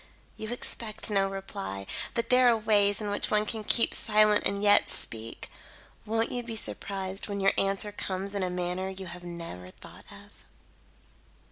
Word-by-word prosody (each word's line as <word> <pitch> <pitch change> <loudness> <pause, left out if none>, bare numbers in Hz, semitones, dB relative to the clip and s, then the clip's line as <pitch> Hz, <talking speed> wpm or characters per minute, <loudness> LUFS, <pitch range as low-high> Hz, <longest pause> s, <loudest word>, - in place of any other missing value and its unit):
You 220 +1 -6
expect 225 -3 -3
no 195 -1 +3
reply, 100 - -5 0.3
but 230 0 -1
there 250 0 +6
are 235 -1 +5
ways 210 -1 +3
in 205 -1 -2
which 205 - -1
one 210 0 +2
can 220 0 -4
keep 230 +2 +3
silent 215 -1 +4
and 200 +1 -2
yet 205 0 +5
speak. 115 0 -5 0.6
Won't 225 +1 +1
you 245 - -2
be 230 -1 -6
surprised 195 -2 -4
when 200 -1 -3
your 195 0 +4
answer 195 +1 +1
comes 195 0 0
in 200 - -1
a 185 - 0
manner 180 +1 -2
you 190 0 -7
have 175 0 -9
never 170 - -7
thought - - -14
of?" - - -13
200 Hz, 170 wpm, -29 LUFS, 185-215 Hz, 0.6 s, there